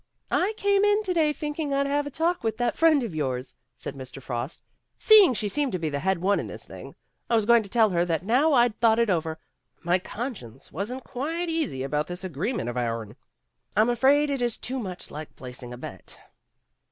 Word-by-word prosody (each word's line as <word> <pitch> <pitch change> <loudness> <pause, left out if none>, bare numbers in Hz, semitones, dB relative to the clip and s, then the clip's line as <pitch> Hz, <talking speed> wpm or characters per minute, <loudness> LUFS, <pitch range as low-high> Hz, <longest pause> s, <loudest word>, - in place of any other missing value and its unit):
"I 395 +4 +2
came 400 0 +3
in 415 +1 +3
to 370 -3 -1
day 315 -3 +3
thinking 295 -1 -3
I'd 280 0 +2
have 290 +1 0
a - - -3
talk 335 +5 0
with 220 -1 -1
that 245 -1 0
friend 315 -4 +4
of 220 -7 -4
yours,"' 130 -4 -3 0.2
said - - -6
Mr. 130 -1 -9
Frost, 125 +1 -5 0.2
" - - -53
seeing 415 - +7
she 210 - -1
seemed 280 +2 0
to - - +1
be 160 -3 -2
the 140 - -2
head 190 +3 +1
one 195 +4 +2
in - - -4
this - - -7
thing. - - -11 0.3
I 235 - +3
was 220 -2 +2
going 235 +1 +6
to 200 - -9
tell 220 -1 +4
her 170 -1 +2
that 170 0 -1
now 270 +8 +3
I'd 240 -4 +3
thought 225 -1 +4
it 230 -3 +2
over, 160 -2 -1 0.5
my 175 +2 +3
conscience 185 - -7
wasn't 245 +6 -4
quite 325 +9 -3
easy 310 - -1
about 150 +2 -1
this 180 +1 -6
agreement 185 - -2
of 120 +1 -3
ourn. 115 -2 -3 0.6
I - - +7
'm 225 - +3
afraid 280 +5 +3
it 275 -2 -1
is 240 -2 0
too 260 +1 -3
much 185 -6 -6
like 155 0 -8
placing 125 -1 -8
a 120 - -7
bet." - - -7
225 Hz, 225 wpm, -26 LUFS, -, 0.6 s, seeing